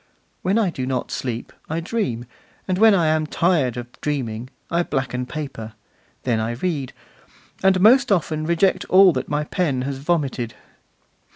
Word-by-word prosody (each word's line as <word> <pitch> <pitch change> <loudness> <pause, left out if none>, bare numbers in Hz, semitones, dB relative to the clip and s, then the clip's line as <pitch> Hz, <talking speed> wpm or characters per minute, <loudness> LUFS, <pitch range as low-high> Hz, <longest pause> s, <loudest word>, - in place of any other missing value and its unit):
When 190 +4 +1
I 210 -6 +2
do 130 -5 -4
not 130 -1 -2
sleep 120 -2 -4 0.2
I 160 +2 -1
dream, 165 - -2 0.4
and 185 -1 0
when 220 -1 +7
I 170 -4 +2
am 155 0 +1
tired 155 -9 +1
of 120 - -4 0.2
dreaming 125 -5 -3 0.2
I 170 +1 +2
blacken 130 -5 -2
paper, 130 -7 -6 0.5
then 120 -3 +1
I 110 +1 -1
read, 140 0 -2 0.7
and 190 -1 +4
most 245 +5 +5
often 155 -4 0
reject 170 +3 +2
all 185 -1 +6
that - - -3
my 150 0 0
pen 150 -5 -1
has 135 0 -4
vomited. 140 -7 -1
150 Hz, 160 wpm, -22 LUFS, 125-180 Hz, 0.7 s, when